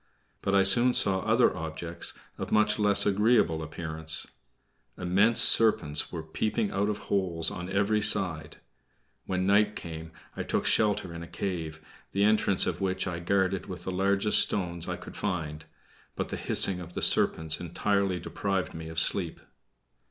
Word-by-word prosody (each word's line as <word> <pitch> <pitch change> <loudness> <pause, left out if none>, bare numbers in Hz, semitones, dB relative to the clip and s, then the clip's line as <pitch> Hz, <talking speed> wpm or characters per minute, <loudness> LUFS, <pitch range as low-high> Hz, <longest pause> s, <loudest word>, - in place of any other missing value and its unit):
But 100 - 0
I 100 - +5
soon 120 +6 +4
saw 95 -1 +4
other - - +2
objects 80 +1 -3 0.3
of - - -5
much 105 +1 +2
less 105 -1 +5
agreeable 105 -5 +2
appearance. 80 0 -4 0.7
Immense 100 +6 +2
serpents 75 -10 +2
were 80 -3 -6
peeping 105 +6 -2
out 100 +2 -1
of 105 - -2
holes 90 -6 0
on 90 +1 -7
every 100 +2 +1
side. 95 -7 +2 0.7
When 95 -1 -1
night 105 +2 +3
came, 80 -2 -8 0.2
I - - -4
took - - -2
shelter 105 -5 +1
in 85 - -8
a 85 - -8
cave, 80 -6 -5 0.3
the 100 - +1
entrance 105 -2 +3
of - - -3
which 95 -1 -1
I 90 -3 -4
guarded 95 +1 -1
with 90 -2 -8
the 95 - -4
largest 100 +3 +2
stones 85 -3 -1
I - - -2
could - - -12
find, 80 -5 -4 0.5
but - - -4
the - - -4
hissing 95 -2 +2
of 90 0 -10
the - - -4
serpents 80 -1 +2
entirely 95 +2 -1
deprived 95 +2 -3
me 80 0 -8
of 80 - -10
sleep. 85 -3 0
95 Hz, 160 wpm, -27 LUFS, 85-100 Hz, 0.7 s, I